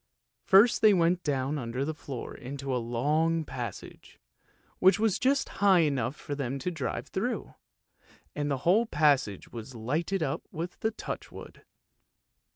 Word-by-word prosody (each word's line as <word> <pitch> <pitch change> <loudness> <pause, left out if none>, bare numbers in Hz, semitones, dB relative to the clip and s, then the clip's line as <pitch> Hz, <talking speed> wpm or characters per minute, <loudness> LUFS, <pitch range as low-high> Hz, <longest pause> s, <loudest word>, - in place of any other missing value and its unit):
First 205 +5 +5
they 215 -2 +6
went 175 +1 +2
down 140 -1 -1
under 125 +2 -3
the 155 - -2
floor 135 -5 -7
into 135 +1 -5
a 125 - 0
long 150 +8 0
passage, 120 -7 -8 0.6
which 190 +2 +5
was 215 -3 +1
just 275 +2 +2
high 195 -3 +6
enough 135 -4 0
for 145 - -6
them 135 -2 -3
to 180 +7 -3
drive 155 -7 -3
through, - - -3 0.8
and 145 0 -1
the 140 - 0
whole 215 +7 +4
passage 140 - +1
was 120 +2 -9
lighted 155 - -1
up 135 -2 -2
with 170 +3 -6
touch - - -6
wood. - - -12
145 Hz, 150 wpm, -29 LUFS, 130-175 Hz, 0.8 s, they